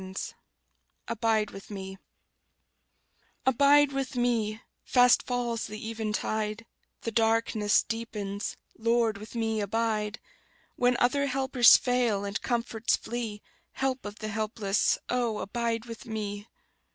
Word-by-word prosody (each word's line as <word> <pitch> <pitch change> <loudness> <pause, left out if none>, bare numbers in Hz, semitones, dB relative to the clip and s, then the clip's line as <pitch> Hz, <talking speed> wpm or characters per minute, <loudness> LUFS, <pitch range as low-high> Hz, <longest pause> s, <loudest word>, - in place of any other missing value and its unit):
Y 190 0 -8
Z - - -4 0.7
Abide 225 -2 +1
With 195 - -11
Me 190 -2 -7 1.5
ABIDE 280 +2 +5
with 270 -1 -3
me: 230 -3 0 0.2
fast 250 -1 +5
falls 240 -2 -2
the 215 +1 -7
eventide; 215 0 -2 0.4
The 230 - -3
darkness 225 -2 +2
deepens; 210 -3 -4 0.2
Lord, 230 -2 +1
with 215 +3 -10
me 225 -2 0
abide; 215 +1 -1 0.6
When 245 0 +2
other 280 +3 +2
helpers 265 -2 +6
fail, 240 -5 +1
and 200 +1 -3
comforts 230 -2 0
flee, 225 -3 -5 0.3
Help 265 -1 -1
of 205 0 -6
the 215 -2 -5
helpless, 215 -2 0
oh, 240 -3 0
abide 230 +2 -2
with 230 -1 -9
me! 205 -1 -4
225 Hz, 120 wpm, -28 LUFS, 210-245 Hz, 1.5 s, helpers